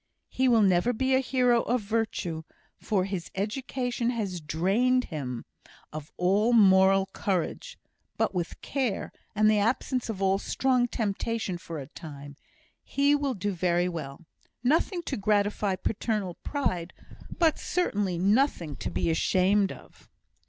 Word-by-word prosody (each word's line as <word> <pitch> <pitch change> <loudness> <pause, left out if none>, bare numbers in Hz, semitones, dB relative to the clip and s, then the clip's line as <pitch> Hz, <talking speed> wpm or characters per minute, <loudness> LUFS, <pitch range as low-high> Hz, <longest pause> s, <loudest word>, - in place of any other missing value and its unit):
He 260 - +1
will 230 -3 +5
never 190 +5 +3
be 260 +3 0
a 260 - +5
hero 250 -2 +2
of 245 0 0
virtue, 205 -6 -2 0.4
for 190 -4 0
his 190 -4 -4
education 245 +3 -2
has 200 -8 -3
drained 200 +12 +2
him 125 -5 -4 0.5
of 155 -1 -7
all 200 +6 +2
moral 195 -2 +6
courage; 200 - -2 0.4
but - - +1
with 175 -2 -3
care, 255 -8 -2 0.2
and 215 +1 +4
the 215 -1 +4
absence 240 +3 0
of 210 -4 -4
all 195 0 +2
strong 255 +1 +1
temptation 220 -3 -2
for 165 -1 -7
a 140 - -6
time, 145 -1 -10 0.5
he 280 +1 +2
will 285 -3 0
do 205 +1 -2
very 175 -1 +1
well; 160 -3 -6 0.4
nothing 330 +7 +1
to 275 - -3
gratify 205 -1 +1
paternal 210 -1 -2
pride, 185 - -2 0.4
but 325 -3 +3
certainly 205 - -1
nothing 195 - +1
to - - -4
be 165 - 0
ashamed 190 +4 +2
of." - - -14
205 Hz, 140 wpm, -27 LUFS, 180-245 Hz, 0.5 s, moral